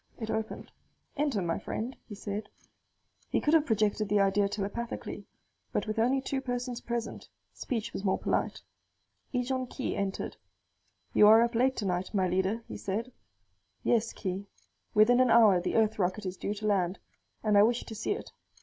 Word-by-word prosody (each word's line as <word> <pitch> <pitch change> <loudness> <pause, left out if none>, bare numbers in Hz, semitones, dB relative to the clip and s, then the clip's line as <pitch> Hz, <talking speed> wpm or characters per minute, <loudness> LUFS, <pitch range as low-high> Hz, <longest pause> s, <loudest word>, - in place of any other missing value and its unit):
It 220 -1 -3
opened. 220 0 -4 0.4
"Enter, 280 - 0
my 165 -1 -1
friend," 240 +4 -4
he 210 - -8
said. 205 +1 -5 0.8
He - - +1
could 300 - +1
have 315 -2 +4
projected 215 -1 +1
the 205 0 +3
idea 200 0 +3
telepathically; 210 +4 -4 0.4
but - - -1
with 215 0 -2
only 255 +4 +3
two 270 0 -2
persons 245 -1 -3
present, 235 -1 -4 0.2
speech 230 -4 -3
was - - -4
more 190 - +2
polite. - - -1 0.7
Ejon 255 0 -1
Khee 260 - -3
entered. 195 -1 -3 0.8
"You 210 - +7
are 220 +2 +8
up 235 +1 0
late 260 +3 +2
tonight, 185 -1 -2
my 190 -2 +3
leader," 190 +5 0
he - - -6
said. 220 +6 -3 0.7
"Yes, 230 -1 +2
Khee. 195 0 -4 0.5
Within 225 +4 +6
an 255 -1 +5
hour 220 -6 +6
the 180 - -2
Earth 220 -1 +2
rocket 190 +3 0
is 185 0 -3
due 205 +2 -3
to 215 +1 -6
land, 190 -3 +1 0.5
and 210 -2 +3
I 200 - +8
wish 235 +3 +3
to 225 - -8
see 220 - -1
it. 425 - -8
215 Hz, 175 wpm, -30 LUFS, 200-240 Hz, 0.8 s, are